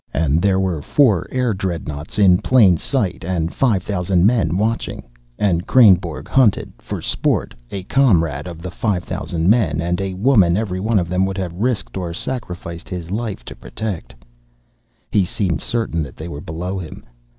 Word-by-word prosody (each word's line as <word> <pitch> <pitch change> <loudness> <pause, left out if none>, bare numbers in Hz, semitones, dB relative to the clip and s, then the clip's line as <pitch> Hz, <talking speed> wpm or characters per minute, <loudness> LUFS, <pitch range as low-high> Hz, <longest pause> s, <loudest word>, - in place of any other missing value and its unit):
And 80 +1 +2
there 95 0 +2
were 90 -5 -1
four 110 - +2
air 125 -3 0
dreadnaughts 85 -5 -4
in 95 -4 +5
plain 110 -9 +5
sight 105 - -1
and 85 -2 -2
five 110 -9 +1
thousand 90 -2 +1
men 105 -6 +2
watching, 110 +3 -2 0.3
and 90 -4 0
Kreynborg 95 - +4
hunted, 125 -7 +2
for - - -6
sport, - - 0 0.2
a 95 -2 -5
comrade 90 - +2
of 85 -2 -9
the 90 - -5
five 95 -2 -1
thousand 85 0 -3
men 95 -8 +3
and 90 +3 -1
a 95 -1 -3
woman 95 -5 +4
every 100 -4 -2
one 110 +3 +1
of 90 -3 +1
them 90 +2 +1
would 95 0 -4
have 90 -3 -3
risked 110 +2 -2
or 85 -3 -4
sacrificed 90 -8 -6
his 90 -1 -6
life 105 - -4
to - - -9
protect. 105 -6 -6 1.0
He 100 - +3
seemed 90 -1 -1
certain 110 -8 -1
that 70 -4 -7
they 80 - -7
were 75 -3 -7
below 90 +5 -4
him. 85 -4 -9
95 Hz, 175 wpm, -19 LUFS, 85-105 Hz, 1.0 s, in